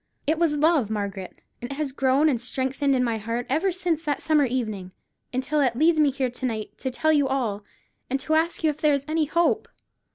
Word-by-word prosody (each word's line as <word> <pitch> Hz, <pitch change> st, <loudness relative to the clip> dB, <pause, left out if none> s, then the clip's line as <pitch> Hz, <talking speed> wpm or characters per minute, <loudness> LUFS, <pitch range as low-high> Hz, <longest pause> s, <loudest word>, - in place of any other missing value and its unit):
It 315 Hz, +2 st, +1 dB
was 330 Hz, -3 st, +2 dB
love, 300 Hz, -7 st, +3 dB
Margaret; 200 Hz, -3 st, -5 dB, 0.2 s
and 245 Hz, -, -5 dB
it 275 Hz, -, -5 dB
has 295 Hz, -2 st, -2 dB
grown 270 Hz, +3 st, +2 dB
and 250 Hz, -6 st, +1 dB
strengthened 265 Hz, +2 st, 0 dB
in 250 Hz, -, +2 dB
my 230 Hz, -2 st, -1 dB
heart 230 Hz, +3 st, -3 dB
ever 340 Hz, +7 st, +2 dB
since 345 Hz, -3 st, -1 dB
that 295 Hz, -3 st, -1 dB
summer 305 Hz, -2 st, +3 dB
evening, 215 Hz, -7 st, -3 dB, 0.4 s
until 265 Hz, +4 st, -1 dB
it 250 Hz, -4 st, +2 dB
leads 315 Hz, +4 st, +3 dB
me 300 Hz, -2 st, +5 dB
here 265 Hz, -2 st, -2 dB
to 250 Hz, +1 st, -5 dB
night 220 Hz, -3 st, -5 dB
to 260 Hz, -, -2 dB
tell 315 Hz, +5 st, +1 dB
you 285 Hz, -2 st, +3 dB
all, 235 Hz, -7 st, -1 dB, 0.5 s
and 270 Hz, +2 st, 0 dB
to 315 Hz, -, -1 dB
ask 325 Hz, +2 st, +1 dB
you 310 Hz, -, +4 dB
if 295 Hz, -, -11 dB
there 300 Hz, -2 st, +4 dB
is 280 Hz, 0 st, -4 dB
any 310 Hz, 0 st, +1 dB
hope. 340 Hz, +8 st, +1 dB
275 Hz, 225 wpm, -25 LUFS, 245-310 Hz, 0.5 s, me